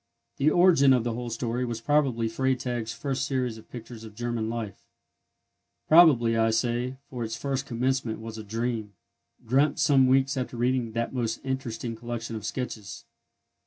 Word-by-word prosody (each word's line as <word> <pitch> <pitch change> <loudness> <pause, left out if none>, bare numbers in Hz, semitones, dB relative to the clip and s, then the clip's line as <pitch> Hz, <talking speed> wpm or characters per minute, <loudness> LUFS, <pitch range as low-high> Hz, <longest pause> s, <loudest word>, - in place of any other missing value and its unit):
The 140 +3 +3
origin 165 -6 +5
of 125 -3 +2
the 120 -1 -2
whole 120 +1 -4
story 120 +1 -2
was 120 -2 -3
probably 130 -4 +1
Freytag's 120 -1 -1
first 135 +3 -3
series 130 -5 -2
of - - -18
pictures 115 -1 -9
of 110 -2 -11
German 120 -1 -2
Life: 115 -4 -5 1.0
probably, 145 -9 +6
I 115 0 +3
say, 120 +3 -1
for 125 -2 -4
its 115 0 -4
first 135 +2 -2
commencement 125 -1 -1
was 110 0 -7
a - - -6
dream, 110 -1 -3 0.5
dreamt 135 +6 +2
some 135 -3 +4
weeks 135 +1 +3
after 125 -1 -3
reading 120 -1 0
that 115 +2 -2
most 115 -3 -2
interesting 120 -3 -3
collection 115 0 -5
of 105 -3 -5
sketches. 110 -6 -5
120 Hz, 160 wpm, -27 LUFS, 115-130 Hz, 1.0 s, probably